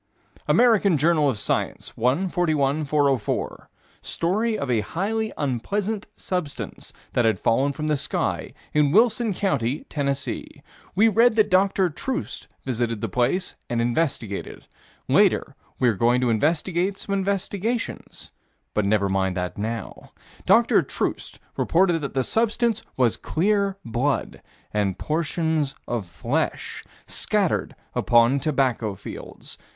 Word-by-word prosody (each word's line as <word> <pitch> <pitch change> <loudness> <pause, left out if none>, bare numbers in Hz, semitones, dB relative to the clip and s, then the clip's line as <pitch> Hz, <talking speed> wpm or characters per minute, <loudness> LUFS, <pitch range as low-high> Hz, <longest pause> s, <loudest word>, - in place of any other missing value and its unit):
American 215 -8 +4
Journal 155 0 +3
of 125 - -1
Science, - - -2
1 135 +11 +1
41 155 -4 +1
404: 140 -6 0 0.3
Story 215 +6 0
of 140 -2 -2
a 115 -3 +2
highly 215 - -2
unpleasant 195 - -2
substance 180 -6 -4 0.2
that 120 - +2
had 110 -4 +2
fallen 135 +5 +2
from 150 +2 -5
the 155 -1 +2
sky, 140 - -1 0.2
in 150 -2 +3
Wilson 230 - +4
County, 140 - -1
Tennessee. 140 -2 -3 0.3
We 215 +4 +5
read 225 +2 +4
that 215 -2 +3
Dr. 190 -1 +3
Troost 265 - -4 0.2
visited 115 -4 -2
the 115 - -2
place 125 - 0
and 120 - 0
investigated. 120 -4 -2 0.4
Later - - +3 0.2
we're 120 -3 +4
going 120 +5 +3
to 125 -2 +2
investigate 170 - +1
some 200 - -4
investigations 200 +4 -2 0.4
but 105 - +1
never 100 0 +2
mind 95 -1 0
that 90 0 -3
now. 110 +2 -5 0.3
Dr. - - +5
Troost - - -3 0.2
reported 175 -1 +3
that 140 -2 -5
the 130 - +2
substance 225 - +1 0.2
was 125 -4 +3
clear 200 +2 0
blood 125 +5 -1 0.3
and 100 -3 0
portions 160 - -1
of 115 -6 -2
flesh 85 -1 -2 0.2
scattered - - 0 0.2
upon 120 +3 +4
tobacco 130 -7 0
fields. - - -9
150 Hz, 125 wpm, -24 LUFS, 120-195 Hz, 0.4 s, We